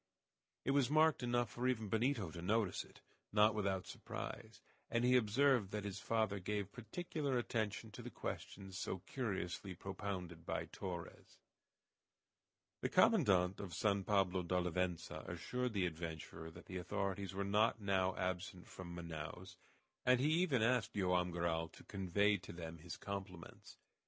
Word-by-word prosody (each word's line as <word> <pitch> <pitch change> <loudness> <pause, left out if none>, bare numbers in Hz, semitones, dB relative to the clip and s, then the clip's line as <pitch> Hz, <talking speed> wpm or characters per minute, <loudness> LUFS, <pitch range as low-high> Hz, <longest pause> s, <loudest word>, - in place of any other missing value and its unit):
It - - +3
was 140 -2 +4
marked 155 0 +5
enough 120 -2 +1
for 125 +1 -1
even 115 -4 +1
Benito 110 - +1
to 85 - -7
notice 105 +2 +1
it, - - -18 0.3
not 105 +1 +6
without 100 -3 0
surprise, - - -6 0.3
and 115 +1 +2
he 125 +1 +6
observed 125 -1 +4
that 105 0 -3
his 100 -1 -4
father 110 0 +1
gave 100 +1 -2
particular 140 - -2
attention 110 -2 -1
to - - -8
the - - -6
questions 95 -1 -5
so 95 - -3
curiously 95 -6 -3
propounded 95 -3 -5
by - - -2
Torres. 90 -3 -7 1.4
The - - 0
commandant 90 -1 +5
of 90 -5 -5
San 100 0 +2
Pablo 95 -2 +2
d'Olivença 90 -1 -1
assured 125 +8 -2
the 95 -3 +2
adventurer 80 -1 -5
that 80 - -12
the 95 - -5
authorities 95 +1 -2
were 100 - 0
not 105 +3 +3
now 95 -2 +2
absent 90 0 -2
from 85 -2 -8
Manaos, 85 +2 -6 0.5
and 125 0 +5
he 145 +4 +3
even 135 -11 +3
asked 125 0 +2
Joam 90 -2 +2
Garral 85 -1 0
to - - -14
convey 100 +1 +2
to 90 - -10
them 85 -1 -7
his 85 +1 -7
compliments. 95 -4 -7
100 Hz, 150 wpm, -39 LUFS, 90-110 Hz, 1.4 s, not